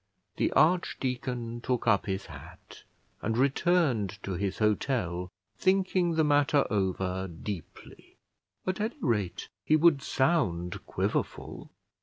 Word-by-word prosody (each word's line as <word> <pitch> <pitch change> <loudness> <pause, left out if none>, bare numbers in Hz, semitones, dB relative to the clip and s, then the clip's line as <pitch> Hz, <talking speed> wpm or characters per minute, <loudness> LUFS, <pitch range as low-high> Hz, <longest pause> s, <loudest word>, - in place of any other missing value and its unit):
The - - +1
archdeacon 125 -7 0
took 125 -1 -1
up 110 -4 +3
his 95 0 -2
hat, 75 -4 -13 0.4
and 110 +2 -1
returned 135 - +2
to 100 - -4
his 95 +1 -2
hotel, 105 -5 0 0.3
thinking 185 -2 +2
the 160 - +3
matter 145 0 +3
over 95 -2 -1
deeply. 85 0 -9 0.5
At 185 +2 -1
any 220 +3 -2
rate 105 - -1
he 155 - +3
would 155 -3 +5
sound 110 - 0
Quiverful. - - -3
120 Hz, 115 wpm, -29 LUFS, 95-155 Hz, 0.5 s, would